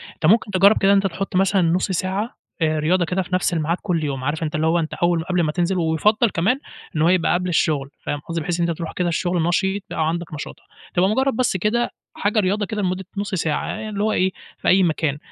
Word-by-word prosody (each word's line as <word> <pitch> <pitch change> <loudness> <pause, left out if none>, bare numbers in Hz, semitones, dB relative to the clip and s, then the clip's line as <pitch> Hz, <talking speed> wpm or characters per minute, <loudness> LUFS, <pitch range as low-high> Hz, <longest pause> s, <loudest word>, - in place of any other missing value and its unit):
أنت - - -4
ممكن 210 +4 +4
تجرّب 195 +2 +5
كده 195 0 +3
إن - - +6
أنت 195 0 +2
تحُط 195 +1 -5
مثلًا 195 +1 +3
نُص 175 +3 +1
ساعة 190 +6 -2 0.3
آآ 155 -1 +2
رياضة 175 +4 +2
كده 180 +3 -1
في 180 - -8
نفْس 185 -1 +1
الميعاد 165 +1 0
كلّ 175 -5 -1
يوم، 135 -3 -3
عارف 150 +4 -2
أنت 155 - -3
اللي 155 +1 +1
هو 170 +2 +3
أنت 160 -1 -3
أول 175 -1 +1
قبْل 180 +1 -1
أمّا 155 -3 +1
تنزِل 180 +3 0
ويُفضّل 195 +8 +2
كمان 205 +8 +1 0.4
إنه 155 +1 +2
هو - - +5
يبقى 180 -2 +3
قبْل 180 +1 0
الشغل 150 -5 +1
فاهم 145 - -3
قصدي، 165 +2 -4
بحيث 175 +2 -2
إن 170 -1 +1
ترُوح 165 0 -6
كده 180 - -1
الشغل 175 0 0
نشيط، 190 +4 0
يبقى 155 - 0
عندك 170 0 -4
نشاط، 145 - -6 0.4
تبقى 185 +2 +3
مجرّد 265 +3 +1
بس 240 -5 +1
كده 225 +6 0 0.2
حاجة 210 +2 0
رياضة 205 +1 +1
كده 210 +1 -3
لمدّة 185 0 -2
نُص 200 0 -2
ساعة، 160 -4 -1
يعني 215 0 -4
اللي 205 -1 -2
هو 215 - +2
إيه 190 -2 +1 0.3
في - - -5
أي 190 +1 +5
مكان، 155 -4 0
180 Hz, 245 wpm, -21 LUFS, 165-195 Hz, 0.4 s, إن